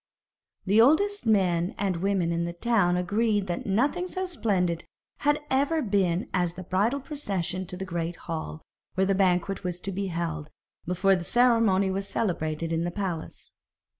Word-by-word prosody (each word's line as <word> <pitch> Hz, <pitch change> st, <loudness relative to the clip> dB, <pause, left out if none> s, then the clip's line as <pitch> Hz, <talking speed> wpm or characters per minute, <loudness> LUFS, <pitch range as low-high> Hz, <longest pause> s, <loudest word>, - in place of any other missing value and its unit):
The 205 Hz, +3 st, +5 dB
oldest 400 Hz, -, +3 dB
men 180 Hz, -4 st, +2 dB
and 195 Hz, -3 st, 0 dB
women 185 Hz, -2 st, 0 dB
in 170 Hz, 0 st, 0 dB
the 170 Hz, -, -4 dB
town 180 Hz, -2 st, +2 dB
agreed 205 Hz, +2 st, +1 dB
that 175 Hz, -2 st, -4 dB
nothing 280 Hz, -, +1 dB
so 370 Hz, +1 st, -3 dB
splendid 190 Hz, -, 0 dB, 0.3 s
had 295 Hz, +1 st, +2 dB
ever 285 Hz, +5 st, +2 dB
been 190 Hz, -5 st, +1 dB
seen -, -, -11 dB
as 175 Hz, -2 st, 0 dB
the 185 Hz, -, -7 dB
bridal 205 Hz, +10 st, +1 dB
procession 195 Hz, -, -3 dB
to 180 Hz, -, -6 dB
the 190 Hz, -, -4 dB
great 170 Hz, -1 st, -3 dB
hall, 160 Hz, -2 st, -6 dB, 0.3 s
where 190 Hz, 0 st, +2 dB
the 195 Hz, -, +2 dB
banquet 190 Hz, +1 st, +1 dB
was 180 Hz, -1 st, -3 dB
to 195 Hz, -, -4 dB
be 195 Hz, +1 st, -2 dB
held, 165 Hz, -4 st, -3 dB, 0.4 s
before 190 Hz, +2 st, +3 dB
the 180 Hz, -, -3 dB
ceremony 230 Hz, -4 st, +3 dB
was 195 Hz, +1 st, -2 dB
celebrated 165 Hz, -5 st, -1 dB
in 165 Hz, +1 st, 0 dB
the 175 Hz, -, -1 dB
palace. 175 Hz, -3 st, -5 dB
190 Hz, 170 wpm, -27 LUFS, 175-220 Hz, 0.4 s, The